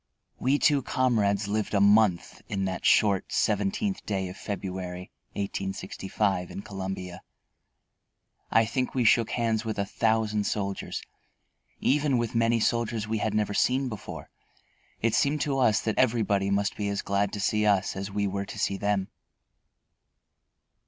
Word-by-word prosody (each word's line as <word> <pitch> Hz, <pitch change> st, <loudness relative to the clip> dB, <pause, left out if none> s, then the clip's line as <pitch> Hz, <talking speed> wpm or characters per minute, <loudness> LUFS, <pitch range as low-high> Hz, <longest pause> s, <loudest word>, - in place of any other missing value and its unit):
We 135 Hz, +3 st, +2 dB
two 145 Hz, -2 st, +3 dB
comrades 110 Hz, -6 st, +1 dB
lived 105 Hz, 0 st, -1 dB
a -, -, +4 dB
month 100 Hz, -2 st, +3 dB
in 95 Hz, -1 st, -1 dB
that 95 Hz, -1 st, -1 dB
short 100 Hz, -3 st, +3 dB
seventeenth 105 Hz, -, 0 dB
day 95 Hz, -3 st, -2 dB
of 90 Hz, -, -8 dB
February, 90 Hz, -3 st, -5 dB, 0.2 s
1865, 95 Hz, -1 st, -2 dB
in 100 Hz, -, -7 dB
Columbia. 95 Hz, -2 st, -6 dB, 1.3 s
I 115 Hz, -, +4 dB
think 125 Hz, +4 st, -2 dB
we 125 Hz, -, +2 dB
shook 115 Hz, 0 st, +4 dB
hands 115 Hz, -2 st, 0 dB
with 110 Hz, -2 st, -3 dB
a 100 Hz, -, 0 dB
thousand 110 Hz, -1 st, 0 dB
soldiers, 100 Hz, -1 st, -3 dB, 0.8 s
even 145 Hz, -1 st, +2 dB
with 120 Hz, -2 st, -1 dB
many 115 Hz, 0 st, +2 dB
soldiers 115 Hz, -1 st, 0 dB
we 110 Hz, 0 st, -1 dB
had 105 Hz, 0 st, -1 dB
never 105 Hz, -1 st, 0 dB
seen 130 Hz, +4 st, +2 dB
before. 110 Hz, -4 st, -8 dB, 0.7 s
It 115 Hz, -1 st, +2 dB
seemed 145 Hz, +1 st, +2 dB
to 140 Hz, -2 st, 0 dB
us 110 Hz, -5 st, +4 dB
that 110 Hz, -, -1 dB
everybody 105 Hz, -5 st, +2 dB
must 100 Hz, +1 st, 0 dB
be 105 Hz, -1 st, -2 dB
as 100 Hz, -, -2 dB
glad 100 Hz, 0 st, 0 dB
to 105 Hz, -, -4 dB
see 105 Hz, +1 st, +1 dB
us 100 Hz, -2 st, +2 dB
as 95 Hz, +1 st, -4 dB
we 100 Hz, +1 st, -1 dB
were 100 Hz, 0 st, -2 dB
to -, -, -8 dB
see 100 Hz, -, 0 dB
them. 100 Hz, -1 st, 0 dB
105 Hz, 150 wpm, -27 LUFS, 100-115 Hz, 1.3 s, a